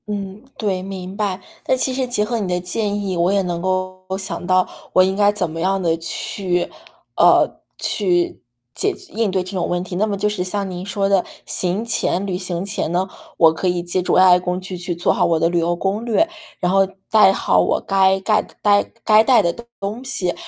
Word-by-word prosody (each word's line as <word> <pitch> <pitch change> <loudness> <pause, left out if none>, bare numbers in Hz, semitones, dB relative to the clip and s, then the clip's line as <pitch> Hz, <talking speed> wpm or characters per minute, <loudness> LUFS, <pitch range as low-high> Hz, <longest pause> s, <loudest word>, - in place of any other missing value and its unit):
嗯， 200 -1 -5 0.2
对， 195 -4 -1
明 190 0 -7
白。 200 -3 -2 0.3
那 - - +3
其 260 0 0
实 260 0 -1
结 225 -4 0
合 230 +1 -2
你 200 - -2
的 180 0 0
建 205 +3 -2
议， 195 -2 -2
我 170 +2 +2
也 200 0 +2
能 175 -2 -3
够 185 0 -2
想 190 -2 -4
到， 185 0 +3 0.3
我 185 - +6
应 190 +1 0
该 205 0 +4
怎 190 -5 -2
么 165 +1 -6
样 190 +2 +1
的 165 -2 +1
去 175 +2 -2 0.5
呃， - - +4 0.2
去 180 -4 0 0.3
解 - - 0 0.2
应 220 0 0
对 185 -1 0
这 185 - -8
种 185 -3 -2
问 175 0 -1
题。 185 -1 -7
那 215 +3 +1
么 200 -2 -2
就 210 - 0
是 210 -3 -2
像 195 +1 -2
您 180 -1 -6
说 200 0 -1
的， 195 -2 +3 0.2
行 185 +5 0
前 200 -4 0
旅 190 -2 -2
行 180 -1 -3
前 200 -5 -2
呢， 180 +2 0 0.3
我 160 -1 +6
可 160 +3 -2
以 175 -1 0
借 175 +1 0
助 180 - 0
AI 185 -1 +6
工 180 0 -2
具 185 0 -7
去 175 0 -3
做 175 - +1
好 - - +1
我 165 -2 +2
的 165 - +2
旅 175 0 +1
游 170 +1 0
攻 195 +5 -2
略， 240 +8 +2 0.3
然 180 - 0
后 195 - +3 0.3
带 210 -3 +7
好 140 - +2
我 90 - +2
该 190 0 +2
盖 215 +2 +2
的 - - -17
呆 205 -1 +4 0.2
该 215 0 +6
带 250 +1 +5
的 170 - +1 0.3
东 210 +5 -4
西， 195 -9 -1
190 Hz, 240 characters per minute, -20 LUFS, 180-205 Hz, 0.5 s, 带